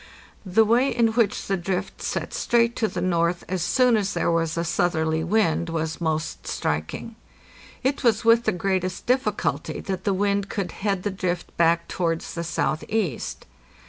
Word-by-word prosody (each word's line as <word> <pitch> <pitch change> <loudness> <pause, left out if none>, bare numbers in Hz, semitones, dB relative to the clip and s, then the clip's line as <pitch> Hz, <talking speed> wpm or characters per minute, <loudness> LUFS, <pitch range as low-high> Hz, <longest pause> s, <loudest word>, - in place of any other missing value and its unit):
The 220 +5 +4
way 240 +5 +3
in 230 -1 +2
which 220 -2 +1
the 195 - 0
drift 185 +2 -3
set - - -3
straight 235 0 +2
to 220 - +2
the - - -4
north 170 -1 +1
as 185 -1 -2
soon 250 +7 +3
as 200 -2 0
there - - +1
was 165 -1 0
a 170 - +1
southerly 160 -1 0
wind 170 -3 +1
was 160 0 -3
most 160 -1 -2
strik 75 +1 -2
ing. 230 - -8 0.7
It 270 +2 0
was 225 -2 +2
with 230 +1 +5
the - - +3
greatest 185 0 -1
difficulty 255 +2 0
that 190 -2 -4
the 200 - +1
wind 200 0 0
could 195 -3 -3
head 195 -2 -2
the 205 - -1
drift 180 -2 -3
back 170 0 +3
towards 165 -2 -2
the 170 - -3
southeast. 170 - -2
185 Hz, 175 wpm, -24 LUFS, 170-220 Hz, 0.7 s, with